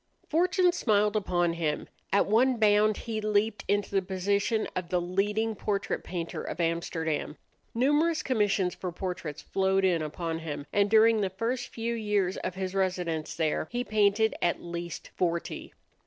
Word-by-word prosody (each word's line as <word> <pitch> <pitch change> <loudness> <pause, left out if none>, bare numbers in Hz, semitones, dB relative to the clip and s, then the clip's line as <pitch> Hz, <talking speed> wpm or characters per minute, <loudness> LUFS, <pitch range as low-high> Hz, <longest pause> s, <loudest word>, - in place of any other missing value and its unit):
Fortune 355 +2 +3
smiled 210 -9 +2
upon 175 -4 +1
him. 155 -3 -2 0.2
At 200 - +4
one 245 +4 +3
bound 215 -1 +4
he 220 -2 -4
leaped 210 0 +1
into 205 0 0
the 195 -1 +2
position 200 +4 0
of 180 -2 -3
the 180 - +1
leading 205 +5 0
portrait 200 -1 -2
painter 170 -2 -4
of - - -6
Amsterdam. 165 -2 -1 0.4
Numerous 295 +6 +2
commissions 205 -7 +1
for 180 - -5
portraits 170 -4 -5
flowed 190 0 +1
in 175 -3 +2
upon 160 +2 -3
him, 150 -3 -5
and 205 0 +3
during 220 0 +5
the 195 - 0
first 235 +6 -2
few 230 0 -3
years 210 -4 0
of 185 - -4
his 190 -1 -3
residence 180 -5 -1
there 160 -1 0
he 245 +1 -2
painted 215 0 +2
at 175 - +1
least 170 -1 -6
forty. 170 -1 -2
195 Hz, 155 wpm, -28 LUFS, 175-220 Hz, 0.4 s, during